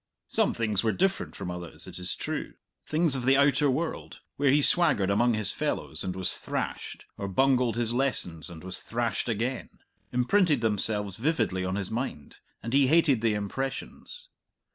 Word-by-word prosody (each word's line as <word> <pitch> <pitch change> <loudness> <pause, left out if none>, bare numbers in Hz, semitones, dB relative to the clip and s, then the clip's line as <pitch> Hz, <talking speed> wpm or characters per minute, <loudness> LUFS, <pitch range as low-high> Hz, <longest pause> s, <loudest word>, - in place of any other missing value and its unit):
Some - - +2
things 105 -4 0
were 110 - +2
different 195 +1 0
from 90 - -5
others, 90 -2 -6
it - - -9
is 90 - -3
true. - - -4 0.3
Things 155 -2 +1
of 130 - -3
the 135 +2 +4
outer 140 +1 +4
world, 155 +5 -3
where 140 0 +2
he 140 +3 +5
swaggered 105 - +4
among 120 +3 +3
his 110 -2 0
fellows - - -3
and 90 -1 -3
was 95 -1 0
thrashed, - - -4
or 100 - -3
bungled 125 +2 +2
his 120 -1 0
lessons 110 - -1
and 85 -1 -10
was 95 -1 -4
thrashed 115 +1 -2
again, 115 +3 -2 0.4
imprinted 145 - +3
themselves 105 -2 0
vividly 115 - 0
on 95 +1 -2
his 100 -2 -3
mind, 115 - -4 0.3
and 115 +2 -4
he 140 -1 +5
hated 150 -5 +4
the 115 -2 +2
impressions. 135 - -5
120 Hz, 170 wpm, -28 LUFS, 100-140 Hz, 0.4 s, he